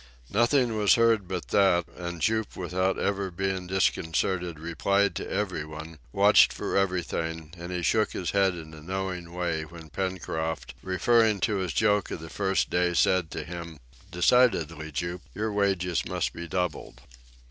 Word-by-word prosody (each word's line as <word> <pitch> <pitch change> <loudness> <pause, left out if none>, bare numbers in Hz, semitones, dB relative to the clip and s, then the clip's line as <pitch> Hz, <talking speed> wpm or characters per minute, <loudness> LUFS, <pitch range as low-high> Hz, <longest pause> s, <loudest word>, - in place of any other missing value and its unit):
Nothing 120 +1 +3
was 105 +1 +4
heard 115 -5 +3
but 90 -2 -4
that, 95 -4 +4
and 85 -3 -5
Jup 110 +1 0
without 95 +1 0
ever 100 -1 -1
being 95 0 -2
disconcerted, 90 -1 0
replied 100 +5 +1
to - - -5
every 95 -6 -1
one, 80 +1 -9
watched - - +6
for - - -4
everything, 85 -4 -1
and 85 +1 -7
he 90 -1 -3
shook 110 +6 +2
his 90 - -2
head 95 -2 +2
in 80 -2 -9
a 80 - -11
knowing 90 0 -4
way 85 -2 -1
when 80 -1 -12
Pencroft, 80 -2 -3
referring 110 +3 +3
to 105 - +1
his 95 -3 -2
joke 105 +3 +2
of - - -5
the 80 0 -9
first 95 -1 0
day, 90 -1 +1
said 85 -1 +3
to - - -5
him, 85 -2 -7 0.3
"Decidedly, 85 -5 +2
Jup, 85 +5 -3
your 105 +2 -2
wages 95 -4 +1
must 90 -1 -2
be 85 0 -7
doubled." 90 -1 -3
90 Hz, 160 wpm, -27 LUFS, 85-100 Hz, 0.3 s, watched